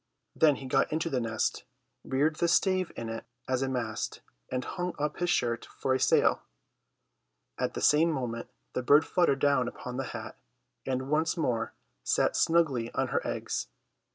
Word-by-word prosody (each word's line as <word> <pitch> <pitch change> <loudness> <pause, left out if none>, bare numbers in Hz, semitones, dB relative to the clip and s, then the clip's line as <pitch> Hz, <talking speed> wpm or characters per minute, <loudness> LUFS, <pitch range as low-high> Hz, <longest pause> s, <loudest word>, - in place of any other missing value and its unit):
Then 155 -3 +5
he 135 - -8
got 130 - +2
into 160 +2 -1
the 130 - +1
nest, 115 -1 -1 0.4
reared 150 +4 +1
the 170 - +2
stave 185 +1 +2
in 115 - -5
it 115 0 -5 0.2
as 130 -1 0
a 135 - 0
mast, 115 -4 -3 0.3
and 125 0 -2
hung 180 -1 -3
up 150 +1 -2
his 175 0 0
shirt 120 -7 0
for 130 - +1
a 130 - +1
sail. - - +3 1.2
At - - -1
the - - -3
same 155 +3 +5
moment 120 -6 -3 0.2
the - - -1
bird 145 +5 +5
fluttered 175 -7 +2
down 140 -3 +2
upon 125 0 -6
the 135 - -2
hat 110 -2 -7 0.5
and 130 +1 -2
once 155 +2 +1
more 120 -8 -1 0.3
sat - - +2
snugly 145 -9 +2
on - - 0
her - - 0
eggs. - - -3
135 Hz, 175 wpm, -29 LUFS, 125-160 Hz, 1.2 s, Then